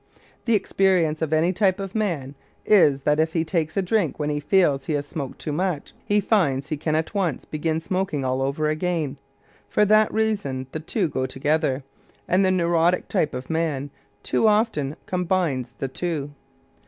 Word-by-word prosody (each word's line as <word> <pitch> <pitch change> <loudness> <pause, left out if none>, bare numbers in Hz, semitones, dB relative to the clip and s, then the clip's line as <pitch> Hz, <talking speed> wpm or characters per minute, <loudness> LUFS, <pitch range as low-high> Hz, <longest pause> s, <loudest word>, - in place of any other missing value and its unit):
The 230 - +3
experience 185 -6 +2
of 160 -2 -1
any 160 +3 +2
type 190 0 +2
of 195 -1 -5
man 170 -11 -2 0.3
is 150 -10 +5
that 150 +2 +2
if 160 0 +1
he 165 - +1
takes 160 0 -1
a 195 - +2
drink 185 -4 0
when 150 -1 -1
he 145 - -1
feels 145 -5 +2
he 155 - 0
has 145 -1 -1
smoked 145 -2 -6
too 150 - -5
much, 170 -1 -2
he 205 0 +2
finds 155 - +1
he 155 - 0
can 155 +1 -1
at 160 +5 -1
once 185 -9 -1
begin 160 +1 -2
smoking 180 -5 -2
all 130 +1 0
over 140 +3 0
again. 155 -3 -1 0.5
For 210 - +3
that 215 +1 +4
reason, 200 -13 -1
the 155 - -4
two 175 +4 -1
go 130 -3 -2
together, 140 +1 0 0.4
and 185 +2 +3
the 190 - +3
neurotic 175 -1 +2
type 150 - 0
of 125 +1 -6
man 150 -4 -1 0.3
too 225 - +2
often 210 - +1
combines 175 -9 -1
the 135 - -2
two. 145 0 -3
160 Hz, 180 wpm, -24 LUFS, 145-185 Hz, 0.5 s, is